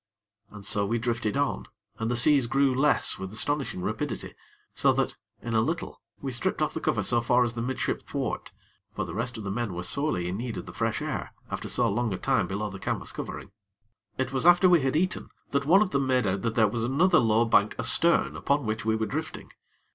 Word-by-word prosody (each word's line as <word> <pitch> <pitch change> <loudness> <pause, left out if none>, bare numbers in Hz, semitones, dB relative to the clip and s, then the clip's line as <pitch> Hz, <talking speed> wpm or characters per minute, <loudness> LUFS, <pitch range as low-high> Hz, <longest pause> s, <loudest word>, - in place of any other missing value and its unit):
And 105 -1 -10
so 100 0 +3
we 110 +4 0
drifted 120 0 -1
on, 145 0 -1 0.3
and 115 0 -1
the 120 - 0
seas 135 +1 +5
grew 135 +1 +2
less 140 +3 +2
with 95 -1 -6
astonishing 120 -4 -1
rapidity, - - -4 0.4
so - - +3
that, - - -1 0.3
in 115 - -4
a 110 - +3
little, 160 +8 -3 0.2
we 135 - -2
stripped 120 - -2
off - - 0
the - - -3
cover - - 0
so 120 - +1
far 120 +2 +3
as 120 -1 -1
the 115 - -4
midship 130 +2 -2
thwart; - - -4 0.4
for - - -2
the 80 - -7
rest 120 +4 -3
of 110 - -7
the 100 - -4
men 110 -3 -3
were 90 - -4
sorely 95 - 0
in 90 +2 -3
need 120 0 -4
of - - -6
the - - -10
fresh - - -2
air, - - -4 0.2
after - - -4
so 120 -1 +1
long 115 +2 -1
a - - -6
time - - +1
below 105 +2 -3
the 100 - -8
canvas - - -3
covering. - - -7 0.7
It 130 0 -2
was 135 +5 +1
after 175 +1 +7
we 175 -3 +5
had 135 +1 0
eaten, 185 +4 -1 0.2
that 140 0 0
one 190 +6 +6
of 190 - -5
them 140 -1 0
made 130 -3 +2
out 95 0 -1
that 115 +1 -2
there 110 -2 +4
was 115 +2 -2
another 160 +9 +3
low 115 0 +3
bank 105 -2 +3
astern 170 0 +4
upon 140 -2 0
which 110 0 -2
we 110 0 +1
were 110 0 -1
drifting. 155 +7 -5
120 Hz, 230 wpm, -27 LUFS, 110-140 Hz, 0.7 s, after